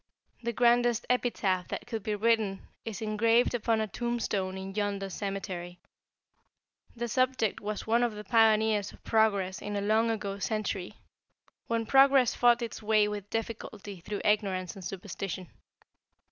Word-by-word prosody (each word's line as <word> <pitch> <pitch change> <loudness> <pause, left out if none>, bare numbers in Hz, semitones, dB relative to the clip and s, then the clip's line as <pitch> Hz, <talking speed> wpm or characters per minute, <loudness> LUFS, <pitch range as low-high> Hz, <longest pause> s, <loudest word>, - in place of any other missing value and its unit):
The 235 0 -1
grandest 240 0 +3
epitaph 195 -7 0
that - - -5
could 225 -3 -4
be 210 +1 -2
written 215 -2 +1 0.2
is 225 -1 -5
engraved 225 +3 +3
upon 230 -1 +1
a 220 - 0
tombstone 210 -5 -2
in 190 0 -6
yonder 200 -1 -2
cemetery. 185 -3 -5 1.2
The 240 0 -3
subject 255 -2 +1
was 210 0 -4
one 230 +2 +3
of 240 -3 0
the 210 - -7
pioneers 220 -1 +3
of - - -18
progress 200 -4 +1
in 205 0 -4
a 200 - -1
long 220 +3 +2
ago 200 -3 -3
century, 205 -3 -2 0.7
when 230 -1 0
progress 270 0 +5
fought 240 0 +4
its 230 - -6
way 215 -1 +3
with 205 -1 -5
difficulty 215 -3 -5
through 205 +4 -5
ignorance 195 -4 +1
and 195 - -10
superstition. 185 -1 -5
215 Hz, 145 wpm, -29 LUFS, 195-230 Hz, 1.2 s, progress